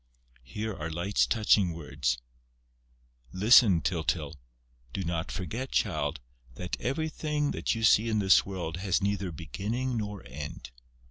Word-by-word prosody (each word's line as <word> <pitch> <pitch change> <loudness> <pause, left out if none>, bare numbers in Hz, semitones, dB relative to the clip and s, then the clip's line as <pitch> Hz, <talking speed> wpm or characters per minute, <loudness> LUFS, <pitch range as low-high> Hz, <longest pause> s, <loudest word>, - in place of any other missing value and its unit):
Here 105 - -5
are 80 -2 -5
Light's 85 +5 +1
touching 105 -5 +3
words: 65 -6 -2 1.1
"Listen, 100 -2 +6
Tyltyl. 75 +3 -1 0.6
Do 95 - -2
not 85 -1 -2
forget, 115 +9 -4
child, 75 +1 0 0.4
that 90 +5 -4
everything 150 0 -1
that - - -1
you 115 - -4
see 110 +1 +5
in 110 - +1
this 95 -2 +5
world 90 -4 -5
has 95 +1 0
neither 100 -2 -1
beginning 105 - -3
nor 105 - -5
end. 70 0 -8
95 Hz, 130 wpm, -29 LUFS, 80-110 Hz, 1.1 s, Listen